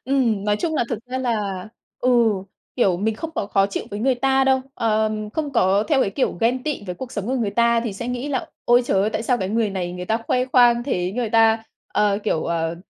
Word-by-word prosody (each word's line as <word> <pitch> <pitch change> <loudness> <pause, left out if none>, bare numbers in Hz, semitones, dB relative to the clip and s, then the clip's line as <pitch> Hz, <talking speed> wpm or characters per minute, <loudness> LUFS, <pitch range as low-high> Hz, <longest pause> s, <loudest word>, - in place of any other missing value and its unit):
Ừm, 240 -7 +1
nói 210 0 +2
chung 320 +6 -2
là 240 - +1
thực 235 - -2
ra 255 +1 -3
là 210 -6 -2 0.3
ừ, 255 - +1 0.7
kiểu, 195 -8 +3
mình 215 +3 -1
không 325 +8 -6
có 200 - -2
khó 195 -1 +2
chịu 200 - -4
với 205 - -5
người 260 +2 +2
ta 270 +2 +2
đâu. 265 0 +3
Ờm, 215 -2 0
không 295 +2 -3
có 200 -4 +3
theo 280 -3 +3
cái 200 - +1
kiểu 255 +6 0
ghen 250 +3 +1
tị 300 -7 -3
với 180 - -4
cuộc 260 +3 -8
sống 205 -1 -4
của 255 - -1
người 225 -5 -1
ta 235 +2 +3
thì 230 -3 -3
sẽ 235 +5 -5
nghĩ 250 +3 -3
là 265 -3 -2 0.2
"Ôi, 240 +1 +5
trời 195 -5 +1
ơi, 205 +2 +1
tại 220 - -2
sao 245 +1 +1
cái 190 - -2
người 220 0 0
này 180 -2 -3
người 180 0 -6
ta 220 +5 +1
khoe 250 0 +1
khoang 245 -2 +4
thế, 180 -8 -2
người 235 0 -2
ta, 225 0 +4 0.3
ờ, 205 -1 +1
kiểu, 160 -7 0
ờ, 165 0 -1
225 Hz, 250 wpm, -22 LUFS, 200-250 Hz, 0.7 s, Ôi